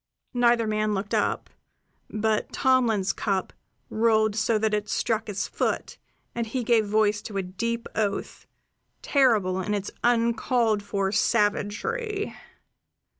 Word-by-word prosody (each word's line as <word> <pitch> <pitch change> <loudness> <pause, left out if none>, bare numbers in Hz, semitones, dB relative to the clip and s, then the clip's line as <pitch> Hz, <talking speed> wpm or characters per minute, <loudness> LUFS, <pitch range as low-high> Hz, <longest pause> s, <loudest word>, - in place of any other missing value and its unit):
Neither 240 -2 +3
man 215 -1 0
looked 195 +2 -4
up; - - 0 0.6
but 215 0 -1
Tomlin's 240 -7 +2
cup 195 -3 -2 0.4
rolled 220 -1 +2
so 220 +1 +2
that 215 0 0
it 210 0 -1
struck 225 -1 0
his 205 -1 -3
foot, - - -2 0.3
and 235 -1 -2
he 250 +3 -2
gave 225 -2 +3
voice 210 0 +2
to 205 - -6
a 195 - 0
deep 230 +6 -3
oath, 205 -2 -3 0.6
terrible 215 -10 +2
in 210 +3 -1
its 200 0 -4
uncalled 235 -2 +2
for 200 -1 -1
savagery. 250 - 0
215 Hz, 125 wpm, -26 LUFS, 205-235 Hz, 0.6 s, Neither